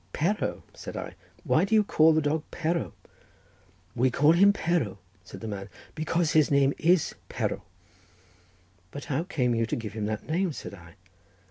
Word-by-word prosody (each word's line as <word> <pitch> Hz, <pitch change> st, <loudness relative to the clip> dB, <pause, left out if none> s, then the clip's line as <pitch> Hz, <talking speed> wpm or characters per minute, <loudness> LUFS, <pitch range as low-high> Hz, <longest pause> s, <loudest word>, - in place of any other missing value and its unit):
"Perro!" 195 Hz, +7 st, -1 dB
said -, -, -8 dB
I; -, -, -6 dB, 0.3 s
"why -, -, +3 dB
do 200 Hz, +3 st, +1 dB
you 215 Hz, -, +5 dB
call 160 Hz, -5 st, +4 dB
the 155 Hz, -1 st, +2 dB
dog 150 Hz, +1 st, 0 dB
Perro?" 170 Hz, 0 st, -2 dB, 1.0 s
"We 125 Hz, +2 st, +2 dB
call 145 Hz, +5 st, +4 dB
him 195 Hz, +4 st, +6 dB
Perro," 165 Hz, -, -1 dB, 0.3 s
said 95 Hz, -, -11 dB
the 110 Hz, -, -5 dB
man, 100 Hz, -2 st, -6 dB, 0.2 s
"because 160 Hz, +1 st, 0 dB
his 155 Hz, -2 st, +4 dB
name 140 Hz, -1 st, +3 dB
is 175 Hz, 0 st, +3 dB, 0.2 s
Perro." -, -, -2 dB, 1.3 s
"But 145 Hz, +8 st, -8 dB
how 145 Hz, +3 st, -1 dB
came 125 Hz, -10 st, 0 dB
you 115 Hz, -1 st, 0 dB
to -, -, -1 dB
give 110 Hz, -4 st, -6 dB
him 105 Hz, -1 st, -3 dB
that 110 Hz, 0 st, -4 dB
name?" 175 Hz, +1 st, 0 dB
said -, -, -8 dB
I. 85 Hz, -3 st, -13 dB
150 Hz, 170 wpm, -27 LUFS, 115-170 Hz, 1.3 s, him